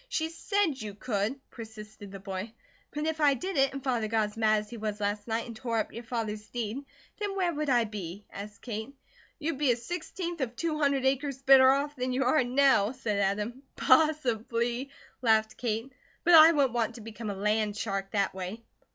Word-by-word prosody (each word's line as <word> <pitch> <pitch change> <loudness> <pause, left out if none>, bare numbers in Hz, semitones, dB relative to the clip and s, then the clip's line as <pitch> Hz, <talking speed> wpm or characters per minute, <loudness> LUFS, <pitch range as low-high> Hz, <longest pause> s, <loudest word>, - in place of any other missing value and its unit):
"She 320 0 -1
SAID 335 - 0
you 210 -2 -6
could," 220 +3 -2
persisted 215 -3 -10
the 195 - -7
boy. 195 +3 -5 0.4
"But 300 +1 -3
if 320 0 -2
I 285 -2 +5
did 375 +8 -4
it, 270 -1 +3
and 275 -1 -7
Father 240 -5 0
got 215 -1 +1
as 210 - -16
mad 215 -1 +3
as 210 - -13
he 235 - -6
was 210 -1 -3
last 205 +1 -2
night 225 0 -1
and 235 -2 -8
tore 230 0 -2
up 220 - -1
your 235 - -6
father's 220 -2 -4
deed, 240 +3 -4 0.4
then 410 -2 -2
where 360 -3 +1
would 300 -1 -2
I 240 -2 +4
be?" 205 -3 -7
asked 205 +1 -9
Kate. 225 +3 -5 0.4
"You'd 300 -2 -3
be 285 -4 +4
a - - +2
sixteenth 340 +5 -5
of 245 -2 -2
two 315 0 -2
hundred 280 -3 +2
acres 270 0 0
better 265 -1 +8
off 285 +2 +1
than 255 -1 -2
you 265 +1 +1
are 260 +2 +3
now," 255 -3 +3
said 210 -5 -2
Adam. 210 +6 -1
"Possibly," 250 -3 +2 0.3
laughed 220 -2 +2
Kate, 235 +2 -2 0.3
"but 350 - +4
I 320 0 +10
wouldn't 280 -6 +2
want 230 -2 0
to 235 - -9
become 220 0 -7
a 200 - -3
land 210 +1 0
shark 195 -2 -2
that 200 -1 0
way. 190 +5 -6
235 Hz, 205 wpm, -29 LUFS, 215-275 Hz, 0.4 s, I